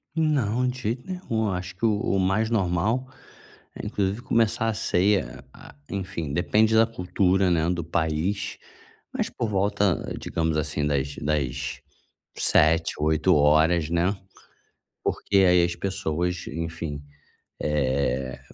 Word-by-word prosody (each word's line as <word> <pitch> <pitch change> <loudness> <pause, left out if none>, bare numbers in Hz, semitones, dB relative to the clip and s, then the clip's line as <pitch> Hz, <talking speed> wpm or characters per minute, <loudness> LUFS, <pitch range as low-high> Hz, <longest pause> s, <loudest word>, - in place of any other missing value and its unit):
Não, 130 -7 +1
de 125 0 -3
jeito 120 - -3
nenhum, 115 - -2
acho 90 0 -4
que 110 +5 -2
o 105 -2 +2 0.2
o 95 - +2
mais 95 +4 +1
normal 110 +5 0 0.7
é - - -7
inclusive 100 +3 -1
começar 115 -2 +1
a - - 0
ceia, 95 - +1
ah, - - -14 0.2
enfim, 90 -6 -4
depende 110 +6 +2
da 115 0 +6
cultura, 95 -2 +1
né, 80 -1 +2
do 85 -1 -2
país, 85 +5 -1 0.6
mas - - -1
por 115 - -3
volta 100 -2 0
digamos 80 -1 -1
assim 75 -1 -1
das 70 -1 -1
das 75 -4 -2 0.6
7, 80 +2 +3
8 80 +4 +3
horas, 75 +2 +3
né, 85 +4 +1 0.9
porque 100 - +1
aí 90 -2 +5
as 85 0 -1
pessoas, 90 -2 -2
enfim, 80 -3 -5 0.6
eh, 65 -3 -1
90 Hz, 130 wpm, -25 LUFS, 80-105 Hz, 0.9 s, da